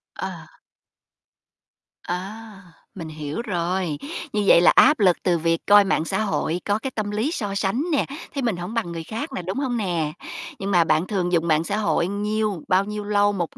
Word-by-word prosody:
À. - - -7 1.4
À, 200 +3 -6 0.3
mình 165 -4 -6
hiểu 155 +4 -5
rồi. 180 -6 -2 0.4
Như 210 0 +1
vậy 170 - +7
là - - +7
áp 305 - +6
lực 185 -4 +4
từ 175 -2 +2
việc 165 0 0
coi 205 0 +8
mạng 180 -5 0
xã - - -1
hội, 180 -5 -1
có 205 +1 +1
cái 265 +4 -4
tâm 215 -3 -3
lý 220 +9 -1
so 205 - -3
sánh 200 +7 0
nè, 295 - +2 0.3
thấy 280 -3 -2
mình 225 -7 0
hổng 175 +5 -6
bằng 230 -7 -2
người 165 -1 -5
khác 225 - -5
nè, - - -3
đúng 185 +6 -4
hông 255 -4 -1
nè? 170 -8 -1 0.5
Nhưng 195 +1 -3
mà 175 -3 +5
bạn 160 +2 +1
thường 180 -4 -1
dùng 170 -1 +1
mạng 155 -1 +3
xã 200 +4 -2
hội 210 -5 +1
nhiêu 210 -1 -1
bao 190 +1 +3
nhiêu 210 0 -5
lâu 205 0 +2
1 175 -4 -4
195 Hz, 205 wpm, -23 LUFS, 170-215 Hz, 1.4 s, coi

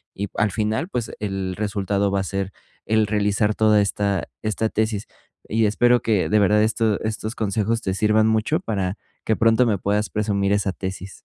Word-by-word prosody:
y 100 +1 -3
al 105 -1 +1
final, 110 - -1
pues, 120 - -3
el 95 -3 -3
resultado 100 -1 -1
va 100 - +1
a - - -2
ser 100 0 -3 0.3
el 110 -1 +2
realizar 105 0 +1
toda 110 -1 +4
esta 100 -3 -1
esta 110 +1 -1
tesis. 110 -1 -1 0.4
Y 110 0 +2
espero 120 +3 +3
que 105 -5 +1
de 105 - +4
verdad 105 +1 +4
esto 110 -1 +1
estos 110 +1 -3
consejos 110 +2 -1
te 95 - -2
sirvan 110 +2 +3
mucho 110 - +1
para 100 - -2 0.3
que 110 - +2
pronto 115 +2 +4
me 110 -4 +1
puedas 105 +3 -1
presumir 100 -2 0
esa 100 -2 +1
tesis. 95 +1 -7
105 Hz, 180 wpm, -22 LUFS, 100-110 Hz, 0.4 s, toda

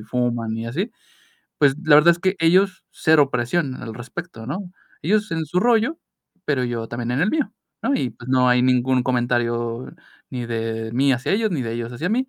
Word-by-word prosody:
fuman 115 0 -1
y 115 - -4
así, 180 - -2 0.7
pues, 140 -2 +4
la 155 - +6
verdad 170 +3 +7
es 170 - -5
que 190 +1 +1
ellos 185 +3 +3
cero 150 -3 +3
presión 130 +3 -1
al 115 - -6
respecto, 120 0 -8
¿no? 180 +6 -5 0.3
Ellos 210 +4 +1
en 160 -1 -1
su 175 +5 0
rollo, 240 +7 +2 0.5
pero 140 -4 0
yo 120 -2 -3
también 120 0 -4
en 135 - 0
el 205 - +2
mío, 290 -8 -1 0.3
¿no? 275 - +1
Y 130 - 0
pues, 120 +3 -13
no 130 -1 +4
hay 125 0 +4
ningún 130 0 +2
comentario, 120 -1 -1 0.4
ni 125 -2 -4
de 115 -1 -3
mí 135 +2 +3
hacia 130 +6 -1
ellos 220 +1 +1
ni 150 -8 -1
de 115 - -3
ellos 120 +1 -4
hacia 155 +9 -3
mí. 255 +5 0
130 Hz, 200 wpm, -22 LUFS, 120-175 Hz, 0.7 s, verdad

